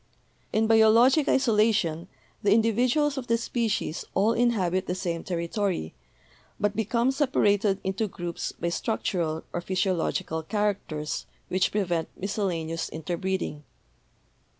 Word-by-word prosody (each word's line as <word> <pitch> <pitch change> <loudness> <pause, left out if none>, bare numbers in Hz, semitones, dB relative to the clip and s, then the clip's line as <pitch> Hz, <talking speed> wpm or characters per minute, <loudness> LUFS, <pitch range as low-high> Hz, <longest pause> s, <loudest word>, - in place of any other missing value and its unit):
"In 220 +1 +2
biologic 230 +6 +5
isolation 210 -9 +2 0.3
the 200 - +2
individuals 250 +6 +2
of 245 - -8
the 230 - +3
species 230 -7 -2
all 210 +4 +3
inhabit 195 -7 +1
the 180 - -1
same 175 -3 -3
territory, 175 - -2 0.7
but 205 0 0
become 235 +4 +1
separated 210 -8 +2
into 195 +3 -1
groups 175 -3 -5
by 170 - -3
structural 170 -5 -1
or 175 - -2
physiological 180 -3 -1
characters 185 -5 -2 0.2
which 185 0 +1
prevent 175 -5 -1
miscellaneous 175 -5 -2
inter 160 +2 -4
breeding. 185 -4 -3
200 Hz, 115 wpm, -27 LUFS, 170-225 Hz, 0.7 s, biologic